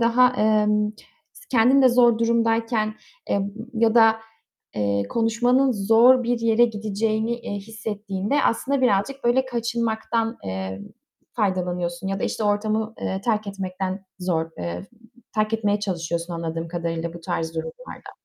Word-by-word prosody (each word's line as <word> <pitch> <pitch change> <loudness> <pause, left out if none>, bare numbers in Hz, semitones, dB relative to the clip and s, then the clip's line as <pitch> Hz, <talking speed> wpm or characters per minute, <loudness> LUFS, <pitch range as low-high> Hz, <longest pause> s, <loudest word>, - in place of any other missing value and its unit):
daha, 235 +2 +5
emm, 210 0 +2 0.6
kendin 255 +3 +5
de 260 - +7
zor 240 -2 +4
durumdayken, 230 -1 +1 0.3
eee, 200 - +1 0.3
ya 225 0 +2
da, 225 -1 +6 0.6
eee, 100 -1 0
konuşmanın 245 +4 +2
zor 230 +5 +5
bir 240 0 0
yere 230 +1 +4
gideceğini, 220 +1 -1
eee, - - -6
hissettiğinde 210 +2 -3
aslında 275 +4 +1
birazcık 250 +3 +1
böyle 250 +2 +3
kaçınmaktan, 230 -1 -1
eee, 95 0 -4 0.5
faydalanıyorsun 180 -4 -1
ya 195 0 -2
da - - 0
işte 220 - -2
ortamı, 215 +2 0
eee, 190 0 -2
terk 215 -3 0
etmekten 190 0 -4
zor, 165 -3 -1
eee, 85 0 -5 0.5
terk 215 0 0
etmeye 210 -2 0
çalışıyorsun 170 -3 -3
anladığım 165 0 -4
kadarıyla 170 -1 -3
bu 170 - -9
tarz 165 0 -3
durumlarda. 160 - -7
215 Hz, 130 wpm, -23 LUFS, 185-230 Hz, 0.6 s, de